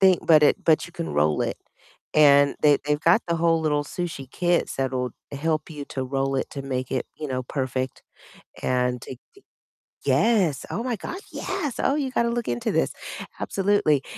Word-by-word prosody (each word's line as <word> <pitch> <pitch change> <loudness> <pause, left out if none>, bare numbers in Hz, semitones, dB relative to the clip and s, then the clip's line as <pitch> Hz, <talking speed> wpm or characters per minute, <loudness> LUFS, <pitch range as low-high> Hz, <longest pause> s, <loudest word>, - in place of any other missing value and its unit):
thing, 190 -2 +6
but 155 -2 +7
it - - +5
but 160 0 +3
you 170 - -14
can 170 -3 -4
roll 75 +1 +2
it. - - -2 0.6
And 145 -2 +6
they 145 -1 +6
they've 150 0 0
got 170 +7 +4
the 170 -1 0
whole 165 0 +2
little 150 -2 +1
sushi 145 -5 -5
kits 175 +1 0
that'll 130 -1 -1 0.2
help 155 +3 -1
you 150 -2 -6
to 130 - -4
roll 135 +1 -1
it - - -2
to 140 - -6
make 130 -1 -3
it, 130 -2 -1
you 155 - -5
know, 130 -1 -2
perfect 130 0 -3 0.6
and 125 -1 0
take 130 +1 -9
the 400 - -19 0.6
Yes. 195 - +2
Oh 230 - -2
my 250 -2 -1
God, 345 - -6
yes! 295 -10 -3
Oh, 275 - +2
you 275 -3 -1
gotta 235 -2 +1
look 235 0 -2
into 120 0 -1
this. - - +1 0.5
Absolutely, 190 -8 +2
150 Hz, 185 wpm, -24 LUFS, 130-180 Hz, 0.6 s, but